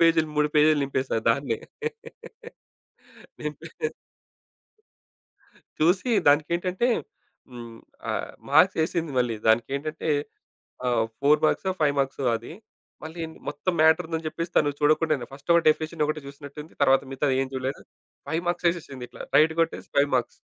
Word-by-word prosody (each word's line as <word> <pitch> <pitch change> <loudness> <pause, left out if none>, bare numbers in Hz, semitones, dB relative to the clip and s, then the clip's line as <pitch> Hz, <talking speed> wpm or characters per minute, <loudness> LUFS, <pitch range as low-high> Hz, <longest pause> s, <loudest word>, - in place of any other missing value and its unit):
పేజీ‌లు 165 -2 +4
3 150 0 +3
పేజీలు 150 0 +5
నింపేసా 130 -3 -1
దాన్నే. 140 +4 +1 1.8
నింపే - - -6 2.1
చూసి 185 +9 +2 0.2
దానికేంటంటే, 175 +9 +2 0.6
హ్మ్. 120 -2 -9 0.3
ఆహ్, - - -3 0.2
మార్క్స్ - - +5
ఏసింది 165 -3 -2
మళ్ళీ. 120 -3 +1
దానికేంటంటే, 140 +8 0 0.8
ఆహ్, 120 -2 +2 0.2
4 145 +2 +4
మార్క్సో, 190 +3 0
5 145 -2 +3
మార్క్సో 135 -1 -1
అది. 115 +7 -10 0.5
మళ్ళీ 160 +2 -8
ఏంది 160 - -9
మొత్తం 150 +5 -2
మ్యాటరుందని 160 0 +3
చెప్పేసి 165 +2 -4
తాను 145 -1 +4
చూడకుండా‌నే 155 -4 +2
ఫస్ట్ 140 +4 -9
ఒక 170 - +5
డెఫినిషన్ 155 0 +1
ఒకటే 155 0 -2
చూసినట్టుంది. 145 +2 -10
తర్వాత 135 0 +5
మిగతాది 135 -1 +1
ఏం 135 - -4
చూడలేదు. 130 +1 -3 0.5
5 165 +2 -1
మార్క్స్ 175 0 +1
ఏసేసింది 135 -7 -7
ఇట్లా - - -9
రైట్ 160 +1 +5
కొట్టేసి 165 - -4
5 140 0 +4
మార్క్స్. 120 - -3
150 Hz, 130 wpm, -25 LUFS, 135-160 Hz, 2.1 s, పేజీలు